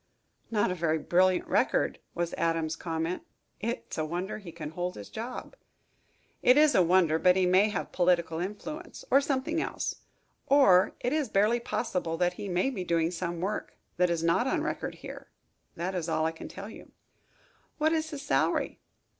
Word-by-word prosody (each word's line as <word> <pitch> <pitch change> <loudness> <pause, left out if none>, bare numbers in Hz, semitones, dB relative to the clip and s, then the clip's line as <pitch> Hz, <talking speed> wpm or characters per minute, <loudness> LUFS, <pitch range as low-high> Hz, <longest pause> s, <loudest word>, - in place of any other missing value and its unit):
"Not 205 -4 +1
a - - 0
very 165 -3 0
brilliant 180 +3 +2
record," - - +1 0.2
was 170 0 -2
Adams's 165 -1 0
comment. 165 +1 -3 0.4
"It's 230 -6 -4
a - - +1
wonder 175 +7 -3
he 190 -5 -9
can 155 -2 -7
hold 180 +2 -3
his 100 - -10
job." 240 - -6 0.9
"It 250 +2 +6
is 300 0 +6
a - - +5
wonder. 170 -2 +4
But 180 +1 +5
he 190 -1 +3
may 190 +4 +4
have 210 - -4
political 170 -2 +2
influence, 300 - -6
or 275 - +6
something 285 +4 -1
else, - - -3 0.5
or, 195 -10 +5
it 245 - 0
is 300 -6 0
barely 215 +5 +3
possible 180 -8 -2
that 180 0 +1
he 200 +2 -6
may 185 +9 +1
be 195 -8 -4
doing 170 -1 +1
some 175 -1 -3
work 200 +3 -3 0.2
that 180 0 +3
is 170 -1 -1
not 170 +10 +2
on - - 0
record - - -3
here. - - -10 0.5
That 180 +3 -3
is 175 -3 -2
all 155 - +1
I 160 - +1
can 165 - -9
tell 195 +1 -8
you." 220 - -12 0.8
"What 315 +1 +2
is 315 -1 0
his 290 -3 -6
salary?" - - +1
180 Hz, 180 wpm, -29 LUFS, 170-235 Hz, 0.9 s, It